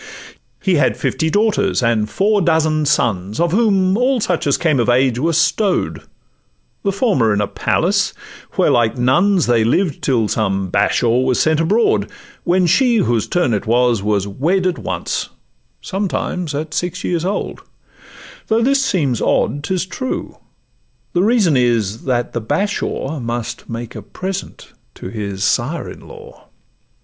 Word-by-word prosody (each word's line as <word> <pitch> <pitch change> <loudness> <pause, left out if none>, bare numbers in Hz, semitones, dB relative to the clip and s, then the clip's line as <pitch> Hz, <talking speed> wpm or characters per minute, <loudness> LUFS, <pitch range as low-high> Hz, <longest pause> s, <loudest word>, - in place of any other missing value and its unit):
He 185 -4 +2
had 135 -3 +2
fifty 160 -1 -1
daughters 205 - +1
and 110 -3 +1
four 205 - +1
dozen 155 -3 +1
sons, 105 -8 0
Of 170 -1 +2
whom 195 -3 +2
all 250 +3 +2
such 180 -7 -1
as 140 - +2
came 155 -6 +1
of 120 - +1
age 125 0 +2
were 165 +5 +1
stow'd, 170 +4 +1 0.8
The 200 - 0
former 195 - +1
in - - 0
a 105 - +1
palace, - - 0 0.4
where - - +2
like 120 0 +2
nuns 175 +10 +3
They 120 -2 +3
lived 150 - 0
till 115 -5 +1
some 95 -3 -1
Bashaw 115 +5 +2
was 130 -1 +1
sent 160 -1 +2
abroad, 205 +8 +2 0.4
When 180 +1 +3
she, 240 +8 +3
whose 120 - +1
turn 175 -9 +1
it 105 +1 -2
was, 120 -2 +2
was 100 -1 0
wed 170 - 0
at 180 -2 0
once, - - -3 0.5
Sometimes 180 -5 -3
at 155 +1 -4
six 180 +2 -3
years 170 -2 -1
old—though 195 +3 -3 1.0
it 275 +1 +3
seems 155 - 0
odd, 145 +1 0
'Tis 185 +3 -1
true; 255 +8 -5 0.7
the 175 - +2
reason 205 - +3
is, 115 -4 0
that 120 -2 -1
the 120 - -2
Bashaw 160 - -2
Must 120 -1 -5
make 115 0 -6
a - - -7
present 190 +1 -7 0.2
to - - -8
his 100 -2 -4
sire 135 +11 0
in - - -11
law. 470 +1 -14
155 Hz, 155 wpm, -18 LUFS, 120-190 Hz, 1.0 s, nuns